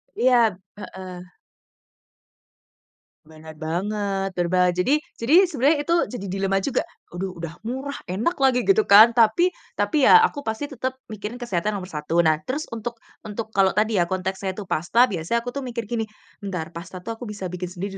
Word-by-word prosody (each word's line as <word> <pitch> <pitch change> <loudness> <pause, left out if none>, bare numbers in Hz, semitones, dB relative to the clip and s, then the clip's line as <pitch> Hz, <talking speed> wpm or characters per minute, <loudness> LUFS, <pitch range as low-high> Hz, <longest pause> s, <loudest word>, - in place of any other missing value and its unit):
Iya. 235 -6 +3 0.2
Heeh. 185 -3 -8 2.1
Bener 155 0 -13
banget, 195 +4 -2
berba 180 +1 +2
jadi 220 +13 +1 0.2
jadi 305 +11 +5
sebenernya 290 +1 +2
itu 335 +3 +1 0.2
jadi 200 -5 -5
dilema 195 0 0
juga, 275 - 0 0.3
aduh 185 +1 -4
udah 170 0 -7
murah, 265 +3 -4
enak 220 - -1
lagi 260 -2 +3
gitu 400 +2 +3
kan, 215 +3 +9
tapi 235 +10 +4 0.3
tapi 295 -4 +2
ya 445 - +9
aku 385 -10 0
pasti 220 +7 -3
tetep 260 0 -3 0.2
mikirin 215 +2 -6
kesehatan 210 -3 -1
nomor 185 -2 -6
1. 155 +3 +1
Nah 155 -1 +3
terus 285 +4 -2
untuk 230 +1 -5 0.3
untuk 220 +1 -5
kalau 195 -2 +3
tadi 215 0 +2
ya, 175 - +3
konteksnya 190 +1 -3
itu 210 - -6
pasta 230 +10 +3
biasanya 190 +7 -1
aku 245 - -4
tuh 280 - -4
mikir 235 -2 -4
gini, 225 -2 -1 0.4
"Entar 180 -5 -4
pasta 175 +2 -9
tuh 230 +2 -5
aku 245 - -6
bisa 205 -3 -5
bikin 180 0 -4
sendiri 190 +2 -6
205 Hz, 170 wpm, -23 LUFS, 180-245 Hz, 2.1 s, kan